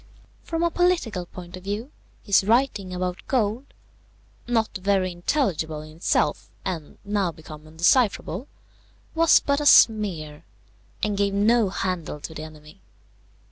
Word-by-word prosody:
From 330 0 -3
a 340 - +2
political 320 - 0
point 175 -1 -10
of 185 - -11
view, 210 +7 -4 0.3
his 200 -2 +4
writing 220 -3 +1
about 180 0 -3
gold, 235 0 0 0.8
not 225 -2 0
very 190 -1 +1
intelligible 175 - -1
in 155 +1 -13
itself, 170 - 0 0.2
and 165 -6 -5
now 200 -3 0
become 155 -1 -12
undecipherable, 190 - +1 0.7
was 330 0 +5
but 280 +1 0
a - - -2
smear, 170 - +4 0.6
and 210 -1 +1
gave 200 -1 +1
no 215 +1 +3
handle 180 -5 -3
to 160 - -7
the 155 - -7
enemy. 155 +3 -12
195 Hz, 135 wpm, -24 LUFS, 170-230 Hz, 0.8 s, was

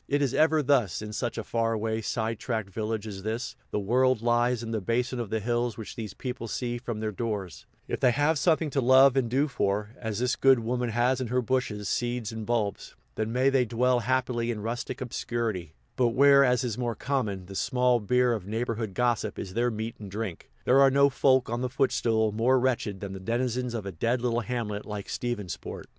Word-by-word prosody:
It 145 0 +1
is 135 -2 0
ever 155 0 +3
thus, 125 -8 +2
in 105 0 -6
such 120 +2 -3
far 115 0 -1
away, 110 0 -1
side 110 0 -2
tracked 110 -5 -3
villages 110 0 -3
as - - -8
this 110 +3 -3
the - - -1
world 125 +3 +2
lies 120 0 +2
in 115 - -5
the 110 -2 -1
basin 120 +4 -1
of 115 -4 -3
the 110 - -1
hills 120 +1 -1
which 110 +1 -7
these 110 -4 -6
people 125 -2 -5
see 120 +1 -3
from 120 -3 -5
their 110 -1 -1
doors; 105 -5 -4 0.2
if - - -3
they - - +4
have 145 +5 +2
something 160 0 +2
to 135 - +1
love 130 +1 +6
and 130 -4 +1
do 135 +5 +2
for, 105 -5 -1
as 110 -3 -3
this 125 +2 +1
good 135 -1 +5
woman 120 +1 -1
has 120 +3 +1
in 125 - -2
her 125 +2 0
bushes, 110 -5 -1
seeds, 120 0 -1
and 110 -1 -6
bulbs, 110 -4 -2 0.2
then 110 +1 -2
may 130 +3 +3
they 135 -2 +3
dwell 125 +2 +2
happily 120 -1 0
in 110 -3 -3
rustic 115 +2 -4
obscurity; 115 -8 -3 0.2
but 125 - +3
where, 140 +1 +7
as 125 -1 +2
is 120 -2 -3
more 120 -2 -1
common, 105 -8 -2
the 95 - -10
small 125 +3 +2
beer 125 +3 +2
of 100 -5 -5
neighborhood 115 -2 -3
gossip 120 -4 0
is 95 - -6
their 120 +3 +1
meat 110 0 -4
and 105 -2 -8
drink, 100 -3 -5 0.2
there 130 +2 +5
are 135 - +7
no 140 +1 +4
folk 130 -1 +3
on 120 +1 -2
the 125 - -1
footstool 115 -4 +1
more 120 +5 +3
wretched 120 -6 -1
than 100 -1 -5
the 95 - -6
denizens 120 +3 -1
of 110 -4 -4
a 100 - -4
dead 115 +9 0
little 120 -1 0
hamlet 110 -3 -3
like 105 -2 -6
Stephensport. 115 -7 -4
120 Hz, 215 wpm, -27 LUFS, 110-125 Hz, 0.2 s, where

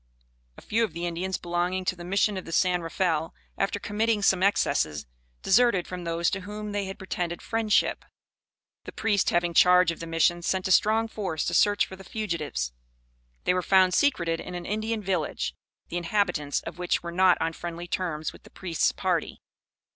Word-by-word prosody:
A - - -13
few 230 +2 +1
of 215 - -2
the 170 +1 -4
Indians 175 +2 -2
belonging 175 +2 -2
to 185 0 0
the 175 - -10
Mission 200 +3 +1
of 185 - -5
the 165 - -8
San 180 +1 +2
Rafael, 165 -1 -1 0.2
after 195 +1 -1
committing 215 0 0
some 190 -2 +4
excesses, 75 - +1 0.4
deserted 210 -3 +4
from 180 -1 -6
those 170 0 0
to 195 - -2
whom 210 +2 -6
they 205 -1 -2
had 190 0 -6
pretended 175 -2 -3
friendship. 225 -2 +1 0.8
The - - -8
priest 210 -3 +1
having 175 0 +1
charge 180 0 +6
of 165 - -8
the 165 - -6
Mission 165 +1 +2
sent 185 +2 -1
a - - -1
strong 220 +4 +4
force 195 -8 -3
to - - -2
search 205 0 +4
for 190 - -10
the 195 - -12
fugitives. 170 - -3 0.7
They - - +2
were 180 - +1
found 185 0 +4
secreted 170 - +2
in 180 - -7
an 175 -1 -6
Indian 215 +1 -2
village, 185 -5 -1 0.4
the 175 - -3
inhabitants 175 -5 0
of 170 - -8
which 180 -1 0
were 170 - -5
not 180 0 +4
on 165 - -1
friendly 175 +1 -6
terms 160 -4 -3
with - - -15
the - - -16
priest's 175 -4 0
party. - - -2
180 Hz, 190 wpm, -27 LUFS, 170-200 Hz, 0.8 s, charge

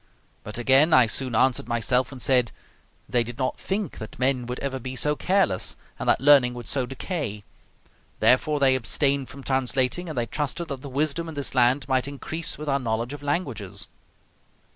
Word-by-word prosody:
But 105 - -5
again, 135 +6 +4
I 130 -2 +7
soon 125 +1 -2
answered 125 0 +2
myself 120 +2 0
and 135 - -9
said, 125 -3 +3 0.6
"They 120 -2 +2
did 120 +1 -8
not 130 -1 -2
think 195 -4 -3
that 110 - -9
men 125 -1 0
would 125 +1 -4
ever 135 -1 -3
be 130 +1 -6
so 150 +3 +2
careless, 180 - 0 0.2
and - - -1
that - - +4
learning 135 -2 +5
would 120 -2 -8
so 130 -3 +1
decay; 135 - -4 0.8
therefore 145 +4 +3
they 135 -1 +4
abstained 135 +2 0
from 140 0 -11
translating, 130 +5 0
and 155 - -6
they 120 - +1
trusted 150 +5 -3
that 135 -3 -5
the 140 - -8
wisdom 155 +4 -1
in 160 - -8
this 140 -1 -1
land 125 +1 +3
might 130 -1 +1
increase 155 +3 -3
with 150 - -7
our 140 -1 +1
knowledge 115 +1 -2
of 145 - -8
languages." 115 - -2
130 Hz, 185 wpm, -25 LUFS, 125-145 Hz, 0.8 s, I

